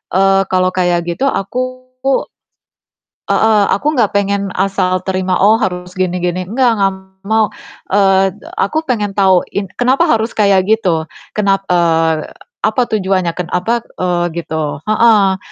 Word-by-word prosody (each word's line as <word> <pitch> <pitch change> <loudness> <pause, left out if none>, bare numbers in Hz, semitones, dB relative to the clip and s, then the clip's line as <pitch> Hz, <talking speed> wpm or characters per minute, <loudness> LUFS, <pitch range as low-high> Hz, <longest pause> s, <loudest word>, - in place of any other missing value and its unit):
eee, 195 0 +4
kalau 185 0 +1
kayak 175 -2 +1
gitu 175 +11 -1
aku 255 +5 -4 1.4
heeh, 215 -2 +3
aku 245 +9 0
nggak 225 -5 +2
pengen 200 0 0
asal 185 -1 0
terima 185 -1 0
oh 215 +4 +4
harus 180 -2 -3
gini 185 -1 -1
gini 180 +1 -2
enggak 245 +1 +2
enggak 195 0 +2 0.3
mau, 220 0 +3 0.5
eee, 195 -1 +3 0.3
aku 315 -8 0
pengen 210 -5 0
tahu 190 -3 +3
in 200 -1 -2
kenapa 265 +7 +2
harus 225 +1 +1
kayak 200 -3 +3
gitu. 180 -8 +1 0.3
Kenap 195 -2 +2
eee, 165 -2 +2 0.4
apa 255 - +1
tujuannya, 190 -5 0
ken 180 - -2
apa, 225 +6 0 0.2
eee, 175 -1 0
gitu, 160 -3 -4
heeh. 215 -3 +4
195 Hz, 140 wpm, -15 LUFS, 180-220 Hz, 1.4 s, eee